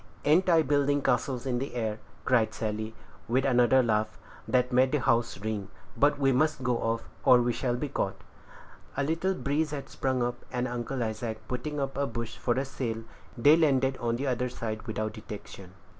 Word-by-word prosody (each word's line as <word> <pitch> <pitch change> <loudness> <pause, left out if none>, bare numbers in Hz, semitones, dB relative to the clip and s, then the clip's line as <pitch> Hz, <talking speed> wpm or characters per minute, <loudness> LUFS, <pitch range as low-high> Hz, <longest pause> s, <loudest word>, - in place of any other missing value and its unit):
Ain't 180 +5 +4
I 165 -2 +5
building 145 0 +2
castles 130 -1 0
in 125 -2 0
the 135 -1 -5
air?" 110 -2 -2 0.3
cried 120 -4 +2
Sally, 110 0 -3 0.3
with 130 +4 +2
another 130 0 +4
laugh, 110 -2 0 0.3
that 125 0 +2
made 130 +1 +4
the 150 - +2
house 120 -6 +1
ring; 105 -1 -4 0.3
"but 145 0 +3
we 135 -1 +3
must 145 +1 +1
go 125 -1 +1
off, 115 0 -1 0.2
or 125 - +7
we 120 0 +1
shall 120 -1 -1
be 135 +4 -2
caught." 100 -8 -2 0.8
A 140 - +2
little 165 +6 0
breeze 150 0 0
had 140 -2 -6
sprung 130 -2 -1
up, 120 0 -3
and 125 0 -1
Uncle 120 +1 -3
Isaac 110 -1 -4
putting 145 +4 -3
up 135 -1 -2
a 140 - +1
bush 115 -1 -5
for 120 - +1
a 135 +2 0
sail, 115 -4 -4 0.3
they 145 +6 +7
landed 135 -5 +3
on 115 -1 -1
the 135 +4 -3
other 125 -1 0
side 110 -3 -4
without 110 -1 -2
detection. 100 -3 -9
125 Hz, 190 wpm, -29 LUFS, 115-140 Hz, 0.8 s, or